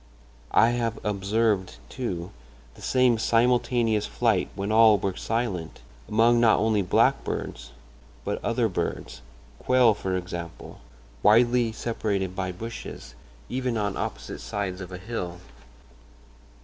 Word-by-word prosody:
I 115 - +6
have 115 -2 -1
observed, 100 - 0
too, 95 - -4 0.4
the - - -16
same 125 -3 +3
simultaneous 120 -2 +2
flight 110 -6 +1
when 100 +2 -3
all 110 -1 +6
were 95 -2 -2
silent, 105 -8 -3 0.3
among 115 +2 +4
not 115 -2 +5
only 110 -1 +2
blackbirds, 90 - 0 0.6
but - - -3
other - - +1
birds—quail, 120 - -1
for 95 -2 -2
example, 85 -2 -7 0.4
widely 120 +2 +4
separated 100 -5 -2
by 95 -1 -2
bushes—even 115 - -6
on 100 -2 -1
opposite - - -5
sides 100 -2 -4
of 90 0 -8
a 90 - -6
hill. 90 -3 -5
110 Hz, 110 wpm, -26 LUFS, 95-115 Hz, 0.6 s, I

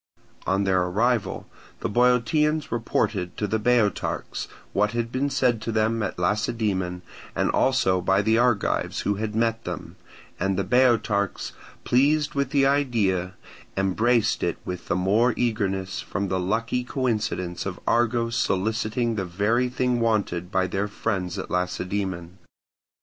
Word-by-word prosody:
On 95 +1 +2
their 95 -2 +2
arrival 105 +3 0 0.4
the - - 0
Boeotians 135 +7 +2
reported 100 -5 -1
to 105 - -1
the 110 +2 0
Boeotarchs 115 -2 0 0.3
what 105 +2 +1
had 120 0 -2
been 135 +3 0
said 125 -5 +1
to 115 - -3
them 110 +1 +1
at - - -3
Lacedaemon 95 -2 -1 0.3
and - - +1
also 95 -9 +2
by 95 +3 +2
the 110 +2 +3
Argives 120 -3 +1
who 100 -1 0
had 110 0 -3
met 115 0 +1
them, - - -6 0.4
and 95 +1 0
the 100 - +1
Boeotarchs, 110 -3 +2 0.3
pleased 145 +4 +2
with 140 -2 0
the 140 -1 +3
idea, 110 -10 +1 0.4
embraced 110 +5 +2
it - - -1
with 90 -1 -6
the - - +1
more 105 +6 +2
eagerness 95 -6 -1
from 100 +2 -3
the 95 0 0
lucky 115 +7 -1
coincidence 110 -9 -2
of 90 - -5
Argos 115 0 +1
soliciting 110 +2 0
the 95 - -1
very 105 +8 +1
thing 125 -1 0
wanted 100 -6 0
by 95 0 +2
their 95 +3 -1
friends 100 -3 -2
at 95 - -6
Lacedaemon. 90 0 -2
110 Hz, 145 wpm, -25 LUFS, 95-120 Hz, 0.4 s, the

